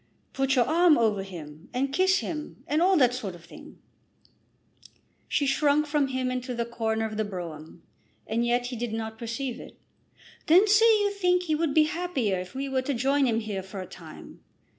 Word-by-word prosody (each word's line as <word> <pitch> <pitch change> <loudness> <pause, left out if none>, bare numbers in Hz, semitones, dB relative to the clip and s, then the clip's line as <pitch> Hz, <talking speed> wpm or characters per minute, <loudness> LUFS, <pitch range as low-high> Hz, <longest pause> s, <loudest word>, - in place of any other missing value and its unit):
Put 270 0 +1
your 245 -2 +4
arm 335 0 +4
over 215 -4 +1
him, 160 -5 -10
and 270 +2 -1
kiss 370 +2 +3
him, 305 -2 -6
and 300 +3 0
all 375 +1 +4
that 250 -4 +4
sort 210 -8 -5
of 170 -1 -15
thing." 170 - -13 1.5
She 285 - 0
shrunk 285 +2 +2
from 295 -2 +1
him 260 -1 -2
into 250 0 -4
the 235 0 -1
corner 225 -1 -2
of 215 -1 -5
the 215 - +1
brougham, 170 -5 -8 0.4
and 230 +2 -1
yet 240 +1 +1
he 245 0 -5
did 235 -1 -4
not 220 0 -5
perceive 235 +2 -4
it. - - -12 0.7
"Then 365 +7 +6
say 420 +2 +5
that 430 -1 +3
you 405 0 +1
think 360 -3 +1
he 320 -3 -1
would 310 -2 0
be 310 - +6
happier 305 - -1
if 180 +4 -8
we 275 +1 -3
were 265 -1 0
to 270 +1 -2
join 270 +3 +2
him 225 -1 +1
here 205 -3 -4
for 190 +1 -9
a 185 - -5
time. 165 -3 -12
255 Hz, 205 wpm, -27 LUFS, 220-300 Hz, 1.5 s, Then